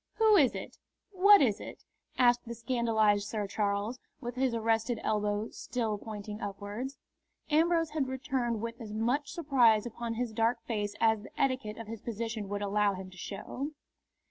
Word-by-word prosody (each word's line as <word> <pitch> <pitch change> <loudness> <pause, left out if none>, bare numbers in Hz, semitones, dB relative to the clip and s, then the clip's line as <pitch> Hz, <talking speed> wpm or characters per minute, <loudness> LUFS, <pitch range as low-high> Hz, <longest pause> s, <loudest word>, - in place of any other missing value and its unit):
"Who 440 -1 +5
is 285 -9 +5
it? - - -7 0.3
What 400 -1 +7
is 215 -6 +2
it?" - - -9 0.3
asked 245 -1 +4
the 235 - -5
scandalised 220 -4 +2
Sir 210 -2 -2
Charles, 205 +4 -1 0.2
with 240 -3 -5
his 255 -1 0
arrested 225 +1 +1
elbow 210 +1 0
still 225 -4 -2
pointing 210 -1 -7
upwards. 205 +7 -5 0.5
Ambrose 330 +1 +3
had 300 -4 0
returned 255 -4 -1
with 230 0 -5
as 215 -2 -7
much 245 +7 0
surprise 250 - +4
upon 235 0 -4
his 240 -1 -2
dark 230 +2 +2
face 205 -3 -2
as 220 -2 +3
the 205 - -13
etiquette 255 -6 0
of 230 - -6
his 220 0 -7
position 225 -2 -4
would 205 0 -2
allow 205 0 +2
him 185 0 -8
to 180 - -14
show. 255 +10 -5
230 Hz, 170 wpm, -31 LUFS, 210-255 Hz, 0.5 s, What